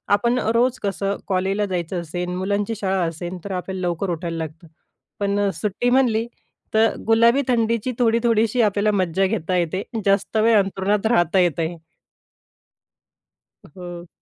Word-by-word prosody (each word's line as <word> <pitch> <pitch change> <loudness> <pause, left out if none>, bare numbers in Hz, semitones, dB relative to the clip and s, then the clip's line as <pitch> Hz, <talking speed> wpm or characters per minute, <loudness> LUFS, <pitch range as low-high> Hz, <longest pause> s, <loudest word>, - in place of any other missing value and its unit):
आपण 235 +4 +1 0.2
रोज 245 +2 +2
कसं, 200 0 -1
कॉलेजला 195 +2 0
जायचं 180 -2 -3
असेल, 175 +2 -4
मुलांची 200 +4 -1
शाळा 195 -3 0
असेल, 175 +3 -5
तर 200 - -5
आपल्याला 185 0 -4
लवकर 175 +3 -2
उठायला 170 0 -4
लागतं. 160 +1 -7 0.5
पण 200 0 +1
सुट्टी 210 +4 0
म्हटली, 240 -3 +2 0.5
तर 220 0 +3
गुलाबी 230 +4 +5
थंडीची 230 -1 +1
थोडी-थोडीशी 230 0 +2
आपल्याला 210 -1 +2
मज्जा 185 +1 +1
घेता 185 -3 -2
येते, 175 +3 -1 0.2
जास्त 200 +2 +1
वेळ 220 +1 +5
अंथरुणात 195 +1 0
राहता 190 -5 +3
येत 175 -3 +2
आहे. 165 +1 -2 1.9
हो. 175 +1 -9
195 Hz, 135 wpm, -22 LUFS, 180-225 Hz, 1.9 s, गुलाबी